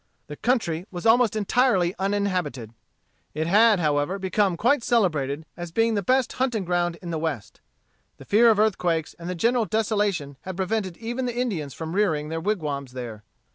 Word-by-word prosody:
The 150 - -8
country 195 - -1
was 175 0 -7
almost 230 -1 +4
entirely 210 -4 +2
uninhabited. 185 - -2 0.6
It 155 +1 -1
had, 210 +3 +5
however, 150 +3 0
become 190 -1 0
quite 245 +5 +2
celebrated 160 - +1
as 175 -1 -7
being 225 +5 +2
the 205 - 0
best 255 +6 +1
hunting 245 -6 -1
ground 175 -1 0
in 170 - -5
the 160 - -2
West. 155 -10 -4 0.6
The - - -13
fear 230 +3 +5
of 220 - +4
earthquakes 180 -7 +1
and 170 +1 -6
the 180 - -3
general 235 +5 +2
desolation 205 - -1
had 185 -1 -7
prevented 190 -2 -2
even 240 +3 -3
the 240 -1 -4
Indians 175 - -2
from 160 0 -5
rearing 160 -7 +1
their 165 0 -3
wigwams 150 -9 -2
there. 120 -4 -7
185 Hz, 175 wpm, -24 LUFS, 160-220 Hz, 0.6 s, had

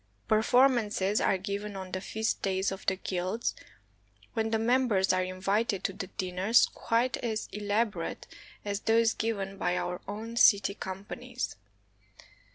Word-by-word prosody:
Performances 220 -3 +3
are 195 - +3
given 200 +2 -4
on 190 -1 -6
the 185 - -3
feast 220 +3 -2
days 190 0 0
of 195 - -6
the 190 - +3
guilds, 190 +4 -2 0.8
when 225 0 0
the 220 - +1
mem 250 +4 +2
bers 190 -4 +2
are 185 0 +2
invited 195 +3 -1
to 195 - -1
dinners 190 +2 +2
quite 235 +2 0
as 220 -3 -3
elaborate 210 +1 -1 0.4
as 200 -1 -1
those 225 +1 +3
given 200 -3 -3
by 180 -1 0
our 180 0 -3
own 225 +3 -6
city 200 -3 +6
companies. 210 +7 -5
205 Hz, 140 wpm, -29 LUFS, 190-225 Hz, 0.8 s, city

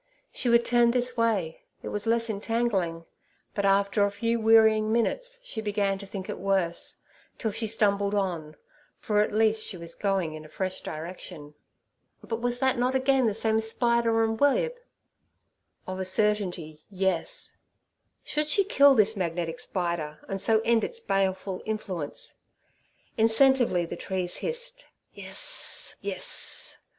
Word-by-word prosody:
She 245 - -2
would 235 0 +4
turn 240 -1 +4
this 245 +1 0
way: 215 -9 0 0.2
it - - -4
was 210 +1 -3
less 230 0 +2
entangling. 200 -6 -1 0.5
But 200 - -1
after 200 +1 +3
a 200 - +3
few 230 +3 -1
wearying 220 -1 +5
minutes - - -1
she 240 - -5
began 205 -2 0
to 200 - -9
think 195 -1 -6
it - - -5
worse, 190 -3 -1 0.4
still 220 - -2
she 225 +2 -2
stumbled 205 -2 +1
on, 170 -6 -2 0.4
for 210 -3 0
at 210 - 0
least 220 0 +2
she 185 - -5
was 170 0 -8
going 195 -6 -1
in 155 0 -8
a 155 - -13
fresh 185 +2 -4
direction. 155 -2 -8 0.7
But 225 0 -4
was 245 0 0
that 260 -1 +1
not 250 +2 +1
again 265 -1 +3
the 210 - 0
same 220 0 +1
spider 230 0 +2
and 225 0 -1
web? 475 - +3 1.1
Of 185 0 -5
a 190 - -2
certainty, 185 -6 0
yes. 190 -3 -1 0.7
Should 300 0 0
she 395 +6 +3
kill 285 -8 +5
this 220 -1 +4
magnetic 170 0 -3
spider, 170 -9 -3
and 195 0 -4
so 220 +1 +3
end 230 -1 +3
its 470 -1 -1
baleful 190 - -1
influence? 190 -8 -5 0.9
Incentively 225 -5 +4
the - - -5
trees 185 -2 -3
hissed - - -4 0.3
'Yes, - - 0
yes.' - - -1
215 Hz, 150 wpm, -27 LUFS, 185-235 Hz, 1.1 s, wearying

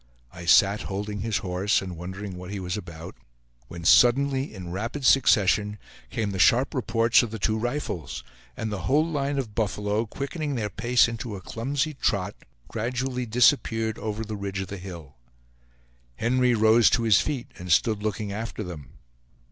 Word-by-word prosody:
I 90 -1 -9
sat 100 +5 +5
holding 100 +1 -4
his 110 +1 -1
horse, 95 +3 +1
and 95 -2 -6
wondering 95 +3 -7
what 90 0 -8
he 100 0 -4
was 90 -1 -3
about, 85 -5 -8 0.5
when 85 -1 -9
suddenly, 135 +6 +4
in 90 -4 -8
rapid 115 +9 -4
succession, 105 -5 +4 0.3
came 105 -3 -2
the 95 - -4
sharp 125 +8 +4
reports 115 -3 +3
of 120 - -3
the 110 - -5
two 110 +1 0
rifles, 120 - -3 0.3
and 110 -1 -3
the 95 -3 -4
whole 150 +3 +4
line 145 -3 -1
of 120 -6 -3
buffalo, 105 +1 -1
quickening 145 +4 -4
their 105 -4 -2
pace 120 +5 +3
into 115 -2 -5
a - - -6
clumsy 140 - -2
trot, 100 -7 -1 0.3
gradually 125 +2 -3
disappeared 115 -2 +2
over 110 +1 -4
the 105 0 -5
ridge 100 -1 -4
of 95 -1 -4
the 100 - -6
hill. 85 -8 -10 1.0
Henry 125 - +2
rose 110 +1 +5
to 115 - +1
his 110 -4 +5
feet, 140 -5 -4
and 90 0 -5
stood 110 +4 +3
looking 105 -1 -3
after 110 0 -5
them. 85 -7 -9
110 Hz, 170 wpm, -26 LUFS, 95-120 Hz, 1.0 s, sat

